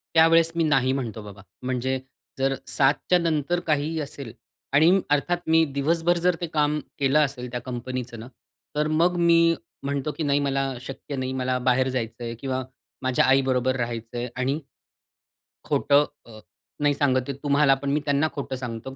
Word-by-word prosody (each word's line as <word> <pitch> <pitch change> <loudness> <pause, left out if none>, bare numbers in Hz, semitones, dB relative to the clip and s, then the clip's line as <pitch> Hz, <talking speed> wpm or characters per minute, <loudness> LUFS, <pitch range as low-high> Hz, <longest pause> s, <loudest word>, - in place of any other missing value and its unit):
त्यावेळेस 165 0 +5
मी 165 - +2
नाही 135 -4 +2
म्हणतो 115 -5 -4
बाबा. 100 -1 -11 0.2
म्हणजे 130 +1 -1 0.4
जर 135 0 +1
7:00च्या 145 +6 +2
नंतर 165 0 0
काहीही 155 +1 0
असेल 140 -5 -7 0.4
आणि 155 +5 +6 0.2
अर्थात 145 +5 +2
मी 160 0 +5
दिवसभर 165 +5 +1
जर 180 0 +2
ते 170 - -2
काम 150 -1 +1 0.2
केलं 140 +1 +3
असेल 125 -3 -5
त्या 125 0 -4
कंपनीचं 125 -1 -5
ना, 115 - -9 0.5
तर 150 0 +2
मग 170 +3 +2
मी 170 -1 +4 0.4
म्हणतो 140 +1 -2
की - - -5
"नाही, 145 -1 +2
मला 135 -1 0
शक्य 135 +2 -7
नाही, 130 0 -2
मला 130 -1 -1
बाहेर 130 +1 +3
जायचंय" 120 -2 -4
किंवा 130 -1 -2 0.4
माझ्या 130 -1 +2
आई 135 +1 +5
बरोबर 130 0 +1
राहायचंय 120 0 -4
आणि 130 +3 0 1.1
खोटं 145 +1 +3 0.2
अ, 110 -2 -12 0.4
नाही 145 -1 +3
सांगत 130 -3 +1
आहे, 140 - -3
तुम्हालापण. 140 -1 +3
मी 150 - +1
त्यांना 145 +2 +2
खोटं 140 -2 -4
सांगतो, 125 0 -6
135 Hz, 160 wpm, -25 LUFS, 130-150 Hz, 1.1 s, आणि